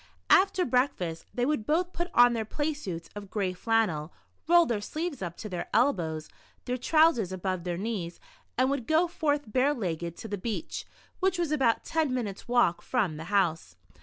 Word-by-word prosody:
After 380 -1 +5
breakfast, 220 - 0
they 245 -1 0
would 290 -5 0
both 350 +4 +1
put 345 +1 -3
on 245 0 +7
their 225 -1 -1
play 295 +8 -2
suits 180 - -6
of 205 -1 -8
gray 195 -4 -1
flannel, 180 -6 0 0.4
roll 345 0 +6
their 225 -7 -1
sleeves 310 - -4
up 175 -2 -5
to 215 - -6
their 180 -4 -4
elbows, 160 - +1 0.4
their 250 - -1
trousers 310 - +3
above 185 -1 -3
their 175 -1 -2
knees, 195 -4 -4 0.4
and 260 +2 +3
would 275 -5 -2
go 320 +3 +3
forth 290 -7 -1
bare 275 +3 +3
legged 170 - -3
to - - -7
the 205 -2 -4
beach, 235 - -4 0.3
which 380 -1 +1
was 340 -3 -1
about 265 -7 +2
ten 320 -4 0
minutes' 210 -6 -4
walk 240 -8 +3
from 200 -12 -1
the 160 - -7
house. 165 - 0
230 Hz, 185 wpm, -28 LUFS, 180-295 Hz, 0.4 s, on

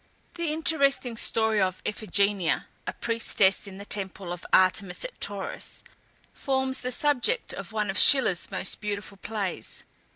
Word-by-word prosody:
The 340 -3 -2
interesting 280 -6 +1
story 220 -2 +2
of 185 -1 -1
Iphigenia, 200 -4 0 0.2
a - - -2
priestess 215 -4 +1
in 190 -1 -10
the 200 - -9
temple 190 -3 -4
of 175 - -9
Artemis 185 - +3
at - - -9
Tauris, - - -5 0.5
forms 265 -1 -1
the 250 - -4
subject 295 - 0
of - - -8
one 210 -2 -1
of 195 - -1
Schiller's 250 -11 +6
most 190 -1 -1
beautiful 205 -1 -5
plays. 200 -2 -4
210 Hz, 140 wpm, -26 LUFS, 195-265 Hz, 0.5 s, Schiller's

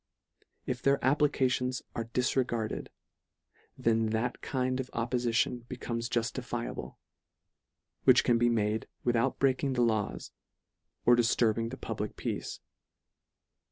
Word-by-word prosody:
If 125 - -3
their 140 0 +4
applications 130 -3 +2
are 115 - -3
dis 125 +2 0
regarded, 120 -4 -1 0.9
then 115 -1 +2
that 110 +3 -1
kind 130 -1 -1
of 130 -1 -3
oppolition 120 0 0
be 125 - -5
comes 115 -1 -3
juftifiable, 115 -2 -3 1.1
which - - +7
can 120 -1 +3
be 120 0 +4
made 110 -1 0 0.2
with 120 -1 +2
out 115 - +1
breaking 135 0 +2
the 125 -1 +2
laws, 110 -3 -1 0.7
or 120 - +7
difturbing 115 -1 +2
the 130 - -7
pub - - -5
lic - - -4
peace. - - -4
120 Hz, 125 wpm, -30 LUFS, 115-130 Hz, 1.1 s, which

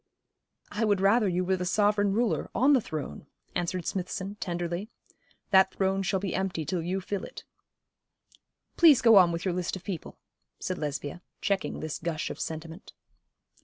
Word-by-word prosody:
'I 225 +2 0
would 205 -2 +2
rather 205 +3 +4
you 180 0 0
were 190 +1 +1
the 180 - -3
sovereign 205 +2 +2
ruler, 230 +3 0
on 275 +4 +5
the 260 - +4
throne,' 150 - -6 0.3
answered 175 0 -2
Smithson, 190 +1 -3
tenderly. 175 +3 -3 0.6
'That 190 -1 +5
throne 195 0 +1
shall 195 0 0
be 195 -1 -3
empty 180 -5 -2
till 180 0 -1
you 185 +3 -2
fill 200 +1 -4
it.' - - -9 1.3
'Please 315 -6 +7
go 225 -3 +8
on 180 -3 +7
with 170 +2 -4
your 185 - +1
list 180 +1 -2
of 185 - -9
people,' 180 -4 -6 0.4
said 185 - -3
Lesbia, 150 +2 -4 0.2
checking 200 -2 -1
this 155 -1 -4
gush 160 -2 -3
of - - -8
sentiment. 160 +3 -6
185 Hz, 165 wpm, -28 LUFS, 170-200 Hz, 1.3 s, go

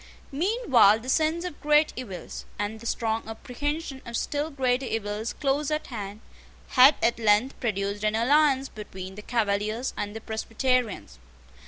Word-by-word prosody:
Meanwhile 280 - +4
the 255 - -7
sense 320 +4 +1
of 355 -5 -7
great 300 +1 +4
evils, 195 -9 -7
and 205 +2 -3
the 235 - -7
strong 225 -1 -1
apprehension 270 +5 -4
of 235 -1 -4
still 295 +2 -2
greater 260 -2 0
evils 215 +1 -3
close 285 0 0
at 305 0 -1
hand, 205 -1 -6 0.5
had 270 +2 +7
at 235 0 +2
length 220 +4 +2
produced 200 -3 -2
an 215 0 +1
alliance 270 +3 +3
between 190 -4 -8
the 210 - -9
Cavaliers 215 +1 -1
and 205 +1 -4
the 225 - -6
Presbyterians. 225 - -1
235 Hz, 150 wpm, -26 LUFS, 210-280 Hz, 0.5 s, had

